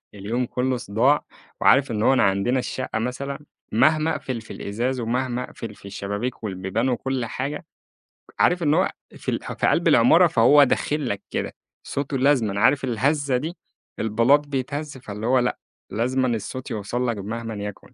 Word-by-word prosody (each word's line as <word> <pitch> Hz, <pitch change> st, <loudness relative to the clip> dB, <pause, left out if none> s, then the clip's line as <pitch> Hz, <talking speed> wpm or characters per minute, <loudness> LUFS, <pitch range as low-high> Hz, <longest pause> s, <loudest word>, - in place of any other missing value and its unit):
اليوم 110 Hz, +5 st, -2 dB
كلُّه 125 Hz, +1 st, -1 dB
صداع، 120 Hz, +6 st, +2 dB, 0.4 s
وعارف 135 Hz, -1 st, +5 dB
إن 105 Hz, -1 st, -1 dB
هو 135 Hz, -, +5 dB
إن 130 Hz, -, +2 dB
عندنا 100 Hz, +7 st, +2 dB
الشقة 125 Hz, -3 st, -3 dB
مثلًا 135 Hz, +4 st, -3 dB, 0.3 s
مهما 155 Hz, +8 st, +3 dB
أقفل 125 Hz, -3 st, -4 dB
في 110 Hz, -, -10 dB
الإزاز 125 Hz, +5 st, -2 dB
ومهما 125 Hz, +1 st, -1 dB
أقفل 115 Hz, -3 st, -8 dB
في -, -, -17 dB
الشبابيك 100 Hz, +5 st, -4 dB
والبيبان 95 Hz, +4 st, -1 dB
وكل 130 Hz, 0 st, -1 dB
حاجة، 140 Hz, +7 st, -4 dB, 0.7 s
عارف 175 Hz, 0 st, +3 dB
إن 150 Hz, -1 st, +3 dB
هو 185 Hz, +3 st, +2 dB, 0.3 s
في -, -, -3 dB
اله -, -, -1 dB, 0.2 s
في -, -, +1 dB
قلب -, -, +2 dB
العمارة -, -, +6 dB
فهو 140 Hz, +6 st, +6 dB
داخل 145 Hz, 0 st, 0 dB
لك 100 Hz, 0 st, -3 dB
كده، -, -, -3 dB, 0.3 s
صوته 140 Hz, 0 st, -2 dB
لازمًا 125 Hz, -7 st, +2 dB
عارف 135 Hz, +3 st, +4 dB
الهزّة 135 Hz, +3 st, +1 dB
دي، 160 Hz, +7 st, -5 dB, 0.4 s
البلاط 115 Hz, +7 st, +3 dB
بيتهزّ 145 Hz, +1 st, -4 dB
فاللي 105 Hz, -3 st, -7 dB
هو 130 Hz, +1 st, +4 dB
لأ، 125 Hz, 0 st, 0 dB, 0.3 s
لازمًا 130 Hz, +4 st, 0 dB
الصوت 125 Hz, +2 st, -4 dB
يوصل 115 Hz, +4 st, -2 dB
لك 115 Hz, -2 st, -1 dB
مهمًا 115 Hz, +3 st, -5 dB
يكُن. 105 Hz, -1 st, -7 dB
125 Hz, 165 wpm, -23 LUFS, 110-135 Hz, 0.7 s, العمارة